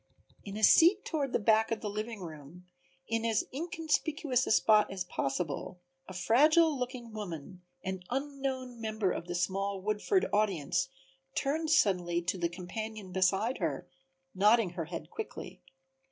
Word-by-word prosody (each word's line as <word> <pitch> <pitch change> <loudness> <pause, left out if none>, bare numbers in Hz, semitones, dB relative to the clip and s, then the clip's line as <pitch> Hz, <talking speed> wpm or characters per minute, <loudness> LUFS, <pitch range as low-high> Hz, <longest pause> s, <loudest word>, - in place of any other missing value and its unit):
In 200 0 -6
a 215 - -5
seat 350 - +6
toward 285 -5 -1
the - - +2
back 220 0 +3
of 225 - -2
the 215 - -3
living 215 +1 -4
room, 160 +1 -10 0.4
in 225 0 -1
as 225 -2 +1
inconspicuous 305 -4 0
a - - 0
spot 215 -1 +5
as 190 -2 -3
possible, 160 +2 -3 0.3
a 185 - -8
fragile 300 - +4
looking 250 -3 -5
woman, 185 -4 -7 0.2
an 190 -1 -3
unknown 265 -2 -3
member 215 -4 0
of 170 - -4
the 175 - -3
small 195 +2 -1
Woodford 215 - +1
audience, 205 - +1 0.5
turned 315 +3 0
suddenly 180 - +3
to 180 +2 -2
the 170 -1 0
companion 195 +3 -6
beside 190 +6 +1
her, 155 -7 -2 0.5
nodding 210 0 +4
her 170 -2 -4
head 170 +2 -7
quickly. 440 - -7
215 Hz, 150 wpm, -31 LUFS, 180-255 Hz, 0.5 s, seat